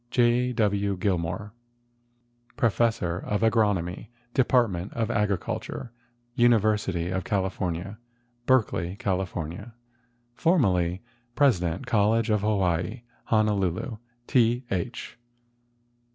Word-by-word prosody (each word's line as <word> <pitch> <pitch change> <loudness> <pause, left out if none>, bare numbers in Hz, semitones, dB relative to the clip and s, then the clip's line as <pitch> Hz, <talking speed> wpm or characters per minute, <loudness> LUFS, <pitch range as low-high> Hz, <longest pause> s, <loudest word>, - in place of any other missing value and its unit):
J. 120 +1 +2
W. 100 -3 +1
Gilmore, 95 +2 -2 1.0
Professor 115 -7 +1
of 105 +1 -2
Agronomy, 105 -5 +1 0.3
Department 120 -8 +2
of 115 0 -1
Agriculture, 105 +2 -2 0.4
University 105 -7 +2
of 95 -1 -1
California, 95 0 -2 0.5
Berkeley, 105 -8 +2
Cal. 95 -2 -1 1.1
Formerly 95 - +1 0.3
President 95 - +2
College 115 -1 +2
of 105 -2 +2
Hawaii, 100 +1 0 0.2
Honolulu. 105 0 0 0.3
T. 120 0 +2
H. 95 +5 -4
105 Hz, 80 wpm, -26 LUFS, 95-115 Hz, 1.1 s, J